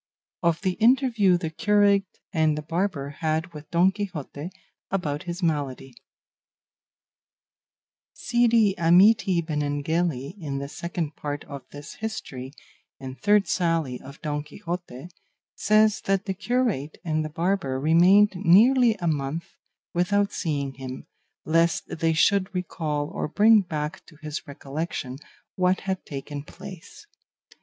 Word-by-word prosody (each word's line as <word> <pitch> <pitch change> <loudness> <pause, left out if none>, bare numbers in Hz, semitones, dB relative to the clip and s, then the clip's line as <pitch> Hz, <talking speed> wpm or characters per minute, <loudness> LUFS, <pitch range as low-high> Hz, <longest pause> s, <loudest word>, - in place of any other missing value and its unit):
OF 170 -2 +1
THE 190 - +1
INTERVIEW 230 -6 +4
THE 165 -3 -4
CURATE 205 +1 +3 0.3
AND 155 -3 +2
THE 150 - -4
BARBER 155 -4 -2
HAD 160 +1 -1
WITH 150 0 -10
DON 175 +3 +4
QUIXOTE 175 -6 -6 0.4
ABOUT 150 -7 -2
HIS 175 +1 -5
MALADY 140 -5 -2 2.2
Cide 235 -4 +2
Hamete 180 +1 +5
Benengeli, 150 -1 -1
in 145 -5 -4
the 140 0 -4
Second 170 0 -4
Part 145 0 -5
of 140 -1 -8
this 145 0 -10
history, 180 -13 -5 0.5
and 130 -1 -8
third 205 -1 +4
sally 165 -8 0
of 140 +3 -12
Don 150 -1 -2
Quixote, 165 -1 -7 0.4
says 215 0 +3
that 195 0 +1
the 195 - -1
curate 210 - -1
and 155 -1 0
the 155 - -4
barber 165 -4 -1
remained 180 +8 +5
nearly 225 +7 +5
a 185 -5 -6
month 150 +1 -2 0.4
without 200 +3 +1
seeing 140 -4 -2
him, 130 -1 -8 0.4
lest 165 0 +1
they 165 0 +2
should 195 +4 +2
recall 155 -5 -2
or - - -2
bring 215 +6 +5
back 155 -4 -4
to 155 - -16
his 150 0 -5
recollection 140 -2 -5 0.4
what 185 0 +2
had 190 -1 -3
taken 145 0 -6
place. 185 - -12
170 Hz, 130 wpm, -25 LUFS, 145-195 Hz, 2.2 s, Hamete